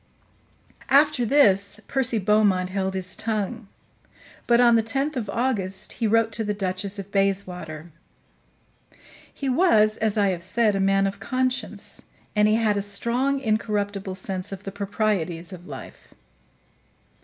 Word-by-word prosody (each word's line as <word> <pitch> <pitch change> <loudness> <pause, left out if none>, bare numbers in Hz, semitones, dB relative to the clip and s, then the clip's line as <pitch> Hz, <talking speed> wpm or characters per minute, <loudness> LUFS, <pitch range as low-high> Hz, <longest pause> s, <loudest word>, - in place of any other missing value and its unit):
After 275 -3 +4
this, 205 -6 +3
Percy 260 -4 0
Beaumont 200 -3 +2
held 190 0 -2
his 185 0 -3
tongue; 220 0 -3 0.8
but 235 0 +5
on 240 -1 +6
the 225 - +4
10th 270 +7 -1
of 225 -6 -3
August 200 -5 -1
he 230 - -1
wrote 225 +1 +3
to 225 +1 -3
the 210 -1 -2
Duchess 195 +1 -3
of 200 0 -7
Bayswater. 180 -5 -2 1.4
He 275 - -5
was, 235 - +4
as 220 -1 0
I 200 -2 +3
have 180 -2 -2
said, 210 +4 +1
a - - 0
man 195 0 +3
of 195 0 -3
conscience, 255 +5 -2 0.3
and 210 0 +4
he 215 - +3
had 220 -2 +2
a - - 0
strong, 235 +7 0
incorruptible 205 -4 -1
sense 190 0 -4
of 195 0 -7
the 195 - -6
proprieties 195 -4 -2
of 180 0 -11
life. - - -11
205 Hz, 145 wpm, -24 LUFS, 195-230 Hz, 1.4 s, on